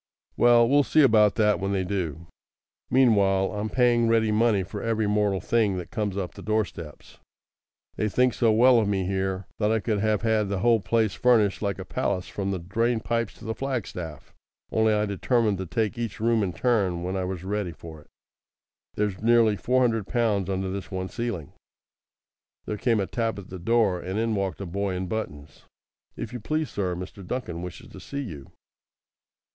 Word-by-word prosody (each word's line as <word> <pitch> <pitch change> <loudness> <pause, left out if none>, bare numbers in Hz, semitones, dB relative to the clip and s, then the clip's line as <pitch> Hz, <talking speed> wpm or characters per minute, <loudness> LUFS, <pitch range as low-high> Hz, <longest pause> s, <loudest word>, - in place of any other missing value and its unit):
"Well, 120 -1 +5
we'll 145 +3 +5
see 155 +2 +3
about 110 -5 +5
that 105 -2 +2
when 100 0 -2
they 95 -1 0
do. 85 -4 -3 0.6
Meanwhile 100 -7 +3
I 105 - -4
am 110 +1 -2
paying 120 0 +3
ready 115 -1 +3
money 105 -2 +2
for 100 +2 -7
every 115 -1 0
mortal 105 -2 +1
thing 105 0 +1
that 90 - -7
comes 105 -4 -2
up 95 -3 -3
the - - -11
door 110 0 +1
steps. 80 -5 -12 0.8
They 105 - 0
think 125 +4 +2
so 115 +2 +2
well 120 +2 +6
of 110 - +1
me 95 -2 0
here 95 0 -2
that 105 0 +2
I 110 - +2
could 105 -1 -1
have 110 0 0
had 110 -3 +1
the 100 -2 -2
whole 115 +1 +4
place 110 +2 +1
furnished 110 -5 +3
like 100 -5 -1
a - - -7
palace 90 - -2
from 100 -1 -4
the 95 - -1
drain 115 +7 0
pipes 115 -1 -2
to - - -13
the 110 - -2
flagstaff, 110 - -5 0.4
only 110 0 +3
I 105 0 +2
determined 105 0 0
to 95 - -4
take 110 +4 -1
each 115 -4 -4
room 115 0 +2
in 95 -4 -1
turn 95 -9 0
when 90 +2 -3
I 95 - -1
was 90 -2 -5
ready 100 -1 -2
for 80 -2 -11
it. - - -23 0.9
There's 105 -2 -2
nearly 115 -1 +4
four 130 +5 +1
hundred 115 -5 +1
pounds 105 -6 0
under 95 0 -2
this 95 0 -5
one 95 -1 -4
ceiling." 115 - -4 1.1
There 105 - -3
came 115 -1 +1
a 100 - 0
tap 115 +1 -2
at 100 - -9
the 95 - -7
door, 105 -2 +2
and 95 +3 -4
in 115 0 0
walked 100 -1 -2
a - - -4
boy 95 +2 -2
in 90 +1 -3
buttons. 75 -8 -6 0.5
"If - - -6
you 125 - -4
please, 155 +7 -2
sir, 95 -3 -2
Mr. 90 +2 -8
Duncan 90 -4 -4
wishes 90 0 -8
to 95 - -11
see 140 +9 -5
you." 80 - -8
105 Hz, 200 wpm, -26 LUFS, 95-115 Hz, 1.1 s, well